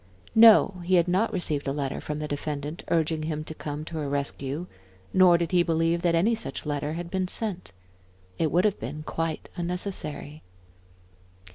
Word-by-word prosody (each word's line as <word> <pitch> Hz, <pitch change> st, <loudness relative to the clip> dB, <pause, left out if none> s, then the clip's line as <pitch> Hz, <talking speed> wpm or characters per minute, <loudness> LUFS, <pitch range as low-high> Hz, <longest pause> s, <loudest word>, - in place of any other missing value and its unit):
No, 220 Hz, -4 st, +7 dB
he 185 Hz, +2 st, +2 dB
had 170 Hz, -1 st, +4 dB
not 190 Hz, +6 st, +2 dB
received 150 Hz, -6 st, -2 dB
a -, -, +1 dB
letter 140 Hz, -1 st, -3 dB
from 150 Hz, -, -4 dB
the 150 Hz, 0 st, -3 dB
defendant, 145 Hz, +2 st, -4 dB
urging 160 Hz, -1 st, +1 dB
him 155 Hz, -1 st, -3 dB
to 160 Hz, -, -6 dB
come 150 Hz, 0 st, -6 dB
to 160 Hz, -, -6 dB
her 145 Hz, -2 st, -2 dB
rescue, 140 Hz, +2 st, -3 dB, 0.5 s
nor 185 Hz, -2 st, +6 dB
did 170 Hz, -1 st, -2 dB
he 180 Hz, -1 st, +4 dB
believe 165 Hz, 0 st, +1 dB
that 170 Hz, -1 st, +2 dB
any 200 Hz, +8 st, +3 dB
such 225 Hz, -, -5 dB
letter 145 Hz, 0 st, -2 dB
had 170 Hz, +1 st, -5 dB
been 185 Hz, -1 st, 0 dB
sent. 190 Hz, -2 st, -3 dB, 0.7 s
It 160 Hz, -3 st, +1 dB
would 180 Hz, +3 st, +3 dB
have 210 Hz, -, +1 dB
been 145 Hz, +7 st, -6 dB
quite 165 Hz, 0 st, -3 dB
unnecessary. 170 Hz, -4 st, -4 dB
165 Hz, 175 wpm, -26 LUFS, 150-180 Hz, 0.7 s, No